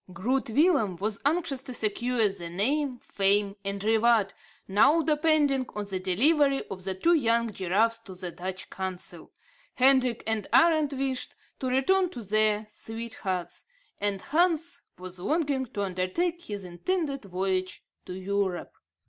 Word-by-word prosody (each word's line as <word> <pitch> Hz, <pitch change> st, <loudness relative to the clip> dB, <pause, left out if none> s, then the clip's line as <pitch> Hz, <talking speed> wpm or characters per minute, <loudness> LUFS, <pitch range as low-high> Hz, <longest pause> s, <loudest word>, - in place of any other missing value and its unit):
Groot 240 Hz, +8 st, -1 dB
Willem 275 Hz, -, +3 dB
was 205 Hz, +3 st, -3 dB
anxious 295 Hz, -3 st, 0 dB
to 255 Hz, -2 st, -8 dB
secure 230 Hz, +1 st, +1 dB
the 185 Hz, -4 st, -5 dB
name, 255 Hz, -, 0 dB
fame, 200 Hz, -2 st, +1 dB
and 200 Hz, 0 st, -3 dB
reward, 220 Hz, -2 st, +3 dB, 0.3 s
now 290 Hz, +12 st, +4 dB
depending 300 Hz, -4 st, +2 dB
on 210 Hz, -1 st, -3 dB
the 195 Hz, -2 st, -3 dB
delivery 275 Hz, -, +2 dB
of 185 Hz, -1 st, -6 dB
the 190 Hz, -1 st, -2 dB
two 335 Hz, -, +3 dB
young 235 Hz, -6 st, +2 dB
giraffes 210 Hz, +6 st, +1 dB
to 195 Hz, -5 st, -12 dB
the 180 Hz, -1 st, -6 dB
Dutch 185 Hz, +2 st, -6 dB
Consul. 185 Hz, -1 st, -6 dB, 0.4 s
Hendrik 255 Hz, -2 st, +4 dB
and 220 Hz, -2 st, -2 dB
Arend 310 Hz, -4 st, +4 dB
wished 265 Hz, -1 st, -3 dB, 0.2 s
to 260 Hz, -, -3 dB
return 350 Hz, +9 st, +2 dB
to 245 Hz, -9 st, -8 dB
their 215 Hz, +1 st, +2 dB
sweethearts; 210 Hz, -5 st, -5 dB, 0.4 s
and 200 Hz, -1 st, 0 dB
Hans 325 Hz, -2 st, +1 dB, 0.2 s
was 185 Hz, 0 st, -9 dB
longing 280 Hz, -, 0 dB
to 210 Hz, -4 st, -4 dB
under 185 Hz, -1 st, -2 dB
take 345 Hz, -, -2 dB
his 205 Hz, -2 st, -6 dB
intended 275 Hz, -, -3 dB
voyage 185 Hz, 0 st, -2 dB, 0.2 s
to -, -, -6 dB
Europe. 190 Hz, -1 st, -2 dB
225 Hz, 145 wpm, -27 LUFS, 195-275 Hz, 0.4 s, now